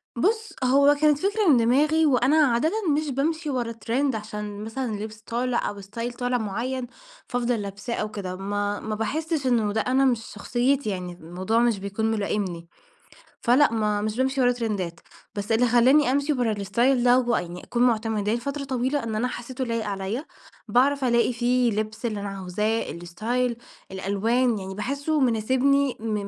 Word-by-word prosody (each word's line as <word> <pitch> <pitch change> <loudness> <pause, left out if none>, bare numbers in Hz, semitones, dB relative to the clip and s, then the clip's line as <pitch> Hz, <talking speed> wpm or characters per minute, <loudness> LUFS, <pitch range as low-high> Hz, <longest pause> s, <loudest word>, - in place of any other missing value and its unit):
بُص، 435 - 0
هو 280 +3 +5
كانت 300 -2 +5
فكرة 410 0 +1
من 265 - +6
دماغي 295 +7 +3
وأنا 270 +1 +3
عادةً 255 +6 +2 0.3
مش 305 -1 -2
بامشي 305 +4 -1
ورا 240 -3 -1
ترند 240 +3 -1
عشان 210 -1 -6
مثلًا 230 +2 -3
لبس 215 +1 -7
طالع 240 +2 -1
أو 200 -1 -8
ستايل 230 +5 -5
طالع 245 0 -1
معين، 245 +4 -3 0.4
فافضل 245 -3 -1
لابساه 200 +4 -5
أو 215 0 -3
كده، 185 -3 -5
ما 205 +1 -2
ما 215 -1 -4
باحسش 300 +5 -2
إنه 220 -4 +2
ده 220 - +1
أنا، 265 +3 +2
مش 240 -3 +1
شخصيتي 250 +3 0
يعني، 180 -2 -4
الموضوع 180 +7 -2
مش 235 -4 +2
بيكون 200 +3 -2
ملائمني. 200 -5 -2 0.8
فلأ 250 +2 +5
ما 210 -2 0
مش 215 +2 -2
بامشي 265 +1 +1
ورا 245 0 +4
ترندات 205 -8 -3 0.4
بس 205 +2 -4
اللي 240 +2 +4
خلاني 255 +4 +5
أمشي 285 +2 +1
ورا 245 -4 0
الاستايل 235 +6 +1
ده 250 +1 +5
ويعني 180 -8 -2
أكون 240 0 0
معتمداه 220 -2 +1
فترة 280 +4 -4
طويلة؛ 260 +1 -1
إن 220 -1 -3
أنا 245 +4 0
حسيته 255 +1 -5
لايق 230 -2 -2
عليَّ، 200 +6 -3 0.4
باعرف 270 +5 +3
ألاقي 235 0 +2
فيه 245 0 +2
لبس 215 +2 -3
اللي 215 -3 -2
أنا 200 - -4
عاوزاه، 195 +4 -2
الاستايل 225 +8 -2 0.3
الألوان، 215 +5 +1
يعني 190 0 -6
باحسه 280 +8 -1
مناسبني 260 +3 +2
م 220 -1 -3
235 Hz, 165 wpm, -25 LUFS, 210-260 Hz, 0.8 s, من